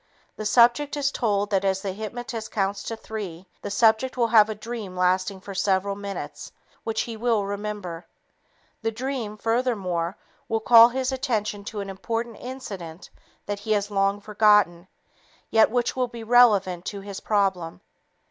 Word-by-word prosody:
The 215 - -3
subject 245 +7 +4
is 285 0 +1
told 205 -4 0
that 195 -1 +2
as 190 -1 0
the 195 - -2
hypnotist 225 +2 -6
counts 200 -1 -1
to 225 - -4
three, 195 -6 -7 0.2
the - - -5
subject 220 +5 +2
will 235 -2 +2
have 220 -2 +6
a 215 - -3
dream 215 -4 -7
lasting 185 +1 +1
for 200 +1 -8
several 195 +1 +1
minutes 200 0 -7 0.3
which 220 -1 -1
he 230 - -5
will 225 -2 +1
remember. 200 -4 -5 0.7
This 225 -1 -2
dream, 245 -4 -4
furthermore, 205 -7 -1 0.3
will 225 - +1
call 230 +1 +8
his 260 +1 -2
attention 220 -6 -2
to 205 -1 -5
an 195 - -6
important 225 +4 -4
incident 195 -10 -8 0.3
that 205 0 -3
he 215 +1 -1
has 205 0 -1
long 195 0 +1
forgotten, 210 -4 +3 0.6
yet 220 -1 +5
which 245 +1 0
will 255 -1 0
be 235 -1 -9
relevant 210 -7 +4
to 200 -1 -5
his 200 0 -7
problem. 190 -4 -1
210 Hz, 160 wpm, -25 LUFS, 195-230 Hz, 0.7 s, call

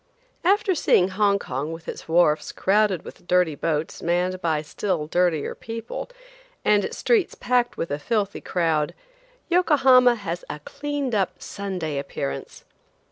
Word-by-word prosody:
AFTER 395 +2 +3
seeing 190 - +3
Hong 200 +1 +2
Kong 140 -2 -4
with 165 0 -9
its - - -7
wharfs 160 -2 +3
crowded 200 -3 +1
with - - -12
dirty 180 -3 +3
boats 155 +1 -2
manned 180 +2 0
by 160 -3 0
still 170 0 -2
dirtier 170 -2 +1
people, 230 - -6 0.6
and 205 -1 +4
its - - -4
streets 450 -7 +2
packed 245 0 0
with 165 - -3
a 145 - -1
filthy 205 +3 -1
crowd, 160 -4 0 0.5
Yokohama 265 -8 +5
has 180 -5 -5
a - - -4
cleaned 285 - -4
up 195 -3 0
Sunday 180 -8 -4
appearance. 70 - -5
185 Hz, 140 wpm, -24 LUFS, 160-235 Hz, 0.6 s, Yokohama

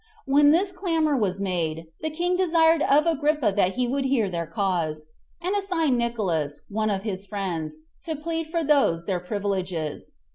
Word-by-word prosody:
When 290 +1 +5
this 365 +6 +3
clamor 330 -5 0
was 195 -6 0
made, 165 -4 -2 0.2
the 315 - -1
king 350 +3 0
desired 330 -3 +3
of 295 +2 +4
Agrippa 300 -8 +1
that 190 -2 +2
he 250 -1 0
would 270 +2 -1
hear 240 -8 +1
their 170 -2 -3
cause, 165 -4 -1 0.3
and 365 +4 -1
assigned 330 -10 +1
Nicolaus, 180 -12 -1
one 215 +1 0
of 195 -1 -1
his 195 -3 -3
friends, 170 -6 -4 0.3
to 320 - -2
plead 325 +2 -3
for 330 +1 -1
those 275 - +2
their 185 -1 -1
privileges. 185 -5 -3
235 Hz, 170 wpm, -25 LUFS, -, 0.3 s, When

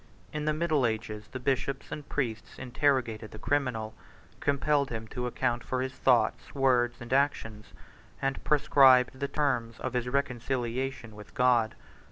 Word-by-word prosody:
In 150 0 -3
the 155 - +2
middle 155 -5 +2
ages, 110 -1 -4
the 130 - -7
bishops 135 +1 -2
and 150 - -7
priests 115 -6 -3
interrogated 125 -4 0
the - - -10
criminal; 115 -4 -1 0.5
compelled 140 0 +1
him 110 -1 -5
to 125 -1 -3
account 120 -1 -1
for 130 0 -2
his 130 0 -4
thoughts, 120 -1 +1
words, 125 -3 +2
and 120 +1 -5
actions; 110 -6 0 0.5
and 135 0 -2
prescribed 135 -3 +5
the 140 - -1
terms 125 -7 -1
of 130 - -4
his 125 0 -1
reconciliation 130 -2 -2
with 105 -1 -13
God. 120 -3 +3
125 Hz, 150 wpm, -29 LUFS, 115-140 Hz, 0.5 s, prescribed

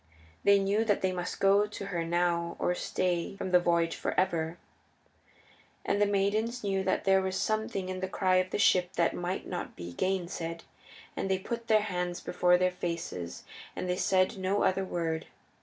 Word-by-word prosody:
They 200 0 +6
knew 200 +3 +1
that 205 -3 +1
they 190 - +2
must 180 -1 -4
go 200 +1 +4
to 205 -1 -7
her 175 -4 -2
now 170 0 0
or 180 - +1
stay 180 +1 -1
from 185 - -4
the 180 - +7
voyage 170 -1 +1
for - - -1
ever. 170 -3 0 1.3
And 205 - +1
the 205 - +5
maidens 215 +4 0
knew 195 -1 0
that - - 0
there 190 0 +4
was 190 0 -2
something 215 -3 -1
in 185 0 -4
the 190 - -2
cry 185 -1 +2
of 185 0 +1
the - - -2
ship 185 -2 +3
that 170 -2 +2
might 175 +2 -3
not - - -5
be 85 0 -7
gainsaid, 170 - -2 0.5
and 195 - -2
they 190 - +2
put 230 +4 -5
their 215 -1 +5
hands 180 -4 -2
before 180 0 +3
their 185 0 +2
faces, 170 - -5 0.3
and - - -3
they 180 - +1
said 190 +2 +2
no 190 +2 +1
other 190 +1 +2
word. 165 -3 -2
185 Hz, 190 wpm, -30 LUFS, 175-195 Hz, 1.3 s, the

